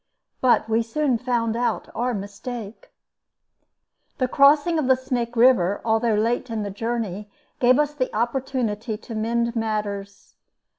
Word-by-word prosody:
But 245 -3 +3
we 225 +1 +2
soon 245 +2 0
found 235 -3 0
out 240 +1 -1
our 245 +1 -1
mistake. 205 +2 -7 1.3
The 255 - +1
crossing 290 +5 +4
of 280 - -1
the 260 - +5
Snake 245 -2 -3
River, 230 -6 +4
although 225 0 +2
late 235 +4 0
in 225 -2 -2
the 200 - -4
journey, 210 -2 -3 0.3
gave 250 +1 +5
us 295 0 +1
the 260 -4 -2
opportunity 235 -2 -2
to 230 - -10
mend 235 +2 -1
matters. 205 -3 -4
235 Hz, 140 wpm, -23 LUFS, 215-255 Hz, 1.3 s, the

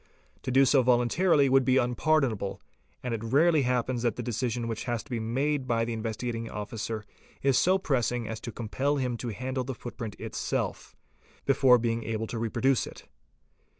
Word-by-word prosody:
'To - - -5
do 135 +2 +5
so 135 0 +5
voluntarily 130 +6 +3
would 135 0 +4
be 130 +1 +3
unpardonable, 125 -5 +1 0.4
and 125 -2 -2
it 115 -1 -3
rarely 150 +7 +4
happens 125 -1 0
that 120 -3 0
the - - -4
decision 120 0 -2
which 115 -1 -4
has 120 -2 -2
to - - -18
be 120 - -1
made 135 +5 -1
by 115 -1 +1
the 115 - -3
Investigating 115 +1 -3
Officer 105 +1 -5 0.4
is 135 -1 +3
so 185 +7 +4
pressing 120 - 0
as 110 -1 -5
to 120 - -6
compel 130 +6 -1
him 125 -3 -1
to 120 - -5
handle 130 +4 -3
the 130 0 -5
footprint 115 -3 -7
itself, - - -3 0.5
before 135 -2 +5
being 115 -1 -1
able 110 0 -2
to 115 +1 -5
reproduce 125 +3 +1
it. - - -12
120 Hz, 180 wpm, -28 LUFS, 115-135 Hz, 0.5 s, do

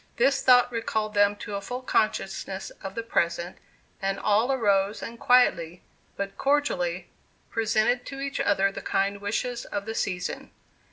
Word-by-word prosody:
This 270 +3 +3
thought 245 -1 +5
recalled 220 -2 -2
them 205 0 +4
to 205 - -8
a 200 - -2
full 250 +4 -5
consciousness 195 -4 -1
of 195 0 -7
the 230 - -3
present, 170 -4 -1 0.4
and 195 0 -1
all 220 +5 +2
arose 205 -5 +1
and 230 0 -7
quietly, 215 -11 +3 0.3
but 200 0 -5
cordially, 290 - 0 0.4
presented 225 +2 +1
to 270 - -7
each 275 0 -3
other 195 -1 +2
the - - -7
kind 200 +1 -1
wishes 235 +4 -2
of 200 0 -4
the 220 - -4
season. 185 -5 -3
215 Hz, 155 wpm, -26 LUFS, 195-245 Hz, 0.4 s, thought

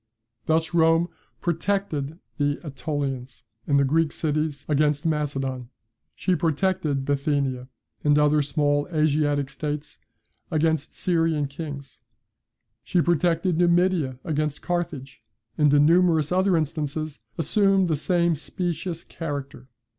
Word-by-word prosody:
Thus 160 +1 +1
Rome 165 +1 +4 0.3
PROTECTED 170 -4 -1 0.2
the 145 0 +2
AEtolians, 140 -3 -4 0.2
and 140 -1 +3
the - - +4
Greek 155 +2 +2
cities, 150 -2 -2
against 150 0 +1
Macedon; 135 -5 -2 0.5
she 185 - 0
PROTECTED 160 -4 0
Bithynia, 140 -3 0 0.4
and 145 0 +4
other 150 0 +4
small 145 0 +1
Asiatic 150 -2 +1
states, 150 +1 -5 0.5
against 160 -2 +1
the - - -19
Syrian 165 -4 +1
kings; 140 -1 -8 0.8
she 180 - 0
protected 170 0 +2
Numidia 175 -6 +2
against 150 -2 -2
Carthage; 145 -8 -3 0.3
and 150 +1 +4
in 145 0 +5
numerous 165 -2 +3
other 185 0 +3
instances 155 -2 -3 0.2
assumed 195 +2 +3
the 160 - +1
same 170 +2 +2
specious 170 +2 -3
character. 140 -5 -6
155 Hz, 115 wpm, -25 LUFS, 145-170 Hz, 0.8 s, in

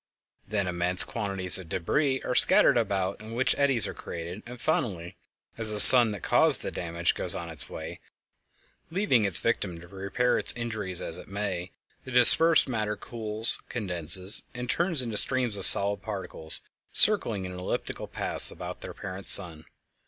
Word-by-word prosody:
Then 100 -1 -5
immense 90 +1 +2
quantities 100 -4 -1
of 90 -3 -15
débris 130 - -4
are - - -5
scattered 125 - +1
about 100 -4 -4
in 110 +1 -12
which 130 +2 -2
eddies 135 -7 0
are - - -8
created, 85 +4 -11
and 125 0 -13
finally, 95 - -5 0.4
as 110 -1 +4
the 105 - 0
sun 120 +1 +11
that 100 -4 -10
caused - - +3
the - - -7
damage 85 0 -5
goes - - +1
on 85 -1 -9
its 80 -3 +2
way, - - -11 0.9
leaving 165 - -2
its 95 -6 -3
victim 85 +3 -5
to 85 - -17
repair 100 +6 -4
its - - -4
injuries 110 -6 -7
as 85 +2 -7
it - - -15
may, 95 -3 -7 0.3
the - - -14
dispersed 130 +7 +3
matter 110 -4 -5
cools, 110 -1 -6
condenses, 90 -3 -2
and 125 0 -6
turns 170 -6 -3
into 115 -3 -6
streams 125 -3 +3
of 100 - +3
solid 100 0 +3
particles 95 -6 -6 0.3
circling 115 - +3
in 90 - -10
elliptical 90 0 -8
paths - - +3
about - - -11
their - - -12
parent 95 0 -11
sun. 80 -3 +6
100 Hz, 165 wpm, -24 LUFS, 90-120 Hz, 0.9 s, sun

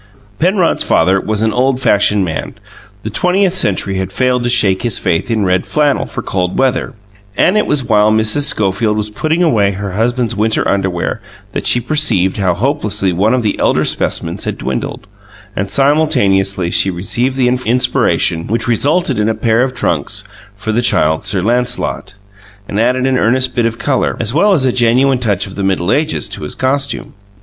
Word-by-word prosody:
Penrod's 180 +1 +1
father 95 +3 +2
was 110 0 -1
an 110 -1 +1
old 130 +2 +1
fashioned 105 -4 +2
man: 80 -2 -5 0.5
the 110 - -5
twentieth 180 - +1
century 100 - 0
had 95 - -4
failed 125 -1 0
to 120 - -1
shake 100 -6 +3
his 120 -3 -1
faith 85 +9 -1
in 110 -3 0
red 90 0 +1
flannel 150 -2 0
for - - -6
cold 90 -1 -2
weather; 130 -1 0 0.4
and 185 - +3
it 210 - +1
was 140 -3 +1
while 105 -3 +3
Mrs. 110 +6 +2
Schofield 105 -2 +1
was 105 0 -3
putting 160 +9 -1
away 105 -11 +2
her 100 0 -5
husband's 115 +3 -1
winter 110 +2 0
underwear 95 -3 -1 0.3
that - - -3
she 125 - +5
perceived 120 - 0
how 95 -4 0
hopelessly 105 - -1
one 105 +8 +2
of 125 - -1
the 105 - -1
elder - - +1
specimens - - -2
had - - -3
dwindled; 65 - -4 0.5
and 95 +1 -3
simultaneously 100 - +1
she 95 - +2
received 120 +9 -2
the 125 -2 +2
inspiration 125 -8 0
which 115 +2 -2
resulted 140 - +1
in 105 +1 +1
a 110 - -1
pair 115 +1 +1
of 130 0 -1
trunks 80 - -2 0.3
for 110 +2 -3
the 115 +2 +1
Child 80 -9 +1
Sir 100 -3 -1
Lancelot, 125 -1 -2 0.5
and 100 - -3
added 125 +3 +1
an 130 -1 +1
earnest 130 +3 +1
bit 120 -1 +2
of 115 0 -5
colour, 130 +1 -1
as 115 0 -1
well 200 +7 +3
as 145 -8 +2
a 130 - +2
genuine 125 +2 +2
touch 100 -5 -1
of 95 - -10
the 100 - -4
Middle 95 -1 0
Ages, 155 +2 0
to - - -4
his 75 - -5
costume. 135 +1 -1
115 Hz, 185 wpm, -14 LUFS, 100-130 Hz, 0.5 s, she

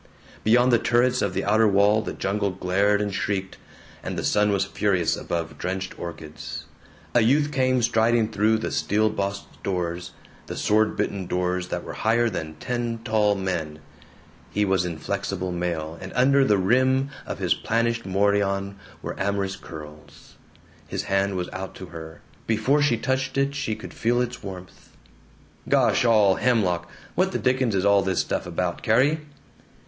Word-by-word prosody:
Beyond 120 +3 +4
the 120 - +5
turrets 125 +2 +2
of 100 -3 -1
the 95 - -1
outer 110 +2 +4
wall 100 +2 +4
the - - -5
jungle 100 +1 -1
glared 95 +3 +1
and 100 -1 -3
shrieked, 95 -1 -2 0.4
and - - -5
the - - -2
sun 105 0 +2
was 100 -1 +1
furious 90 -5 +1
above 80 -3 -4
drenched 95 +1 -4
orchids. 80 -3 -7 0.5
A 120 - +5
youth 145 +6 +3
came 130 -3 +2
striding 115 -1 +2
through 110 +1 +2
the 110 - -3
steel 110 +1 +1
bossed 100 -1 -4
doors, 90 -2 -3 0.3
the - - -6
sword 110 0 +2
bitten 100 -3 -2
doors 90 0 -1
that - - -4
were - - -7
higher 115 +1 +2
than 80 -4 -5
ten 120 +5 -3
tall 105 -3 +2
men. 90 -6 -3 0.7
He 105 0 +1
was 95 -2 +1
in 85 -2 -4
flexible 95 +1 -3
mail, 85 -2 -3
and 95 - -7
under 135 +3 +5
the 105 -6 +3
rim 130 +7 +2 0.2
of - - -4
his - - +2
planished 115 +1 0
morion 100 0 +1 0.3
were - - -3
amorous 100 0 -1
curls. 75 -5 -12 0.5
His - - -3
hand 95 0 0
was 90 -1 -2
out 95 0 -6
to 95 - -8
her; 80 -1 -9 0.3
before 115 +7 +2
she 145 -5 +3
touched 130 +2 -1
it 140 0 +1
she 140 -6 -2
could - - -10
feel 120 +2 +1
its 125 0 -2
warmth 90 -2 -10 0.7
"Gosh - - +3
all 105 -5 +5
hemlock! 90 -8 +1 0.2
What 185 +3 +1
the - - +1
dickens 130 -4 +1
is 95 0 +1
all 100 -1 +5
this 95 -2 -1
stuff - - -1
about, 90 0 -2
Carrie?" 135 +8 +3
100 Hz, 165 wpm, -24 LUFS, 90-115 Hz, 0.7 s, the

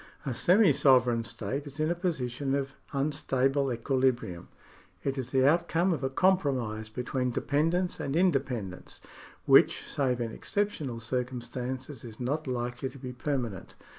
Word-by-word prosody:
A 135 - -1
semi 180 - +5
sovereign 125 -4 +4
state 115 +5 -4
is 140 +2 -10
in 155 +2 +1
a - - +3
position 140 -6 -2
of 135 -1 -2 0.2
unstable 135 -1 +1
equi 120 +3 -2
librium. 120 -10 0 0.6
It 135 -1 -1
is 130 -3 -4
the 130 +1 +3
outcome 170 +3 +2
of 150 - -4
a 135 - +1
compromise 135 - +1
between 125 +2 -2
depen 145 +6 +1
dence 180 +1 -1
and 140 - -2
independence, 135 - -1 0.5
which, - - +5
save 130 -3 0
in 115 -1 -2
exceptional 155 - -2
circum 125 +2 -2
stances, 130 +2 -6
is 115 -3 -10
not 145 +5 -2
likely 125 +1 -2
to 135 - -13
be 125 -1 -7
permanent. 125 -7 -3
130 Hz, 155 wpm, -29 LUFS, 120-145 Hz, 0.6 s, semi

